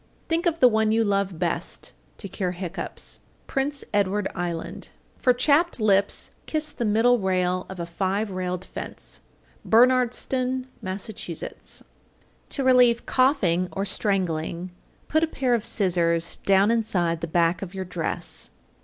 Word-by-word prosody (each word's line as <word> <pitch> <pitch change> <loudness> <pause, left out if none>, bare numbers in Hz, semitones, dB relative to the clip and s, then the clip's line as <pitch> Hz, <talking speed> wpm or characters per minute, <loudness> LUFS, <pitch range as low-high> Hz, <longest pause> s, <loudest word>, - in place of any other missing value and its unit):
Think 335 +2 +1
of 335 -1 +1
the 255 - +8
one 220 -2 +2
you 225 +1 +3
love 200 -4 0
best, 170 0 -3 0.2
to 200 - -6
cure 185 -1 -3
hiccoughs. 180 -1 -5 0.3
Prince 275 +1 -1
Edward 205 0 +1
Island. 170 -2 -4 0.3
853. - - -28
For 250 - +5
chapped 295 +5 +3
lips 200 -2 +2 0.2
kiss 305 -1 -1
the 240 - -3
middle 230 +3 +4
rail 185 -1 0
of 190 -1 -8
a 170 - -2
five 195 +4 -1
railed 185 -1 -3
fence. - - -8 0.4
Bernardston, 255 +2 +2 0.2
Mass. 190 +1 -4
854. 180 -6 -7 0.6
To 275 - -2
relieve 250 -2 +5
coughing 200 - +2
or 195 - -2
strangling, 180 -4 -1 0.4
put 315 +1 +2
a - - +3
pair 260 -5 0
of 230 -3 +1
scissors 170 -6 +1
down 195 +2 +3
inside 180 -8 0
the 170 - -2
back 170 +1 +2
of 195 -1 -7
your 190 -1 -4
dress. 170 -2 -5
200 Hz, 145 wpm, -25 LUFS, 180-245 Hz, 0.6 s, the